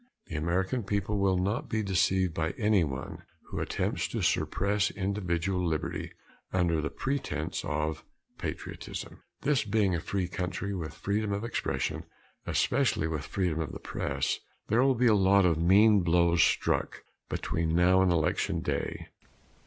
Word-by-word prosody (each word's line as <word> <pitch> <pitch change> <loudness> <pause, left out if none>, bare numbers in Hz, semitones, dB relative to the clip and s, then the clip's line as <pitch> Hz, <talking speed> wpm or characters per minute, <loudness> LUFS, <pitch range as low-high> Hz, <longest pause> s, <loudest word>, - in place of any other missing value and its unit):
The 85 - -7
American 90 +9 0
people 100 0 -1
will 95 -1 +3
not 100 +6 -1
be 110 -1 0
deceived 95 -2 +2
by 80 0 -2
anyone 95 - 0 0.3
who - - -4
attempts - - -1
to - - -3
suppress 100 +1 +1
individual 95 -2 -1
liberty 80 -3 -2 0.4
under 85 -4 +1
the 75 - -2
pretense 135 - -3
of 75 +1 -2 0.4
patriotism. - - -6 0.2
This 145 -2 +2
being 105 -3 +1
a 85 - 0
free 95 +3 -2
country 90 +2 -3
with 80 -6 -5
freedom 105 +1 -1
of 100 +2 -2
expression 115 - -2 0.4
especially 130 - +1
with 75 -3 -3
freedom 90 -5 -1
of 80 - -4
the - - -6
press - - -2 0.3
there 115 +3 +4
will 135 0 +4
be 125 +2 +2
a 115 - +6
lot 100 -1 +5
of 80 -3 +2
mean 100 +5 +6
blows 85 0 +3
struck - - +1 0.3
between 80 -1 -1
now 90 +2 +5
and 95 -1 +3
Election 80 -2 +1
Day. - - -3
95 Hz, 150 wpm, -29 LUFS, 85-105 Hz, 0.4 s, a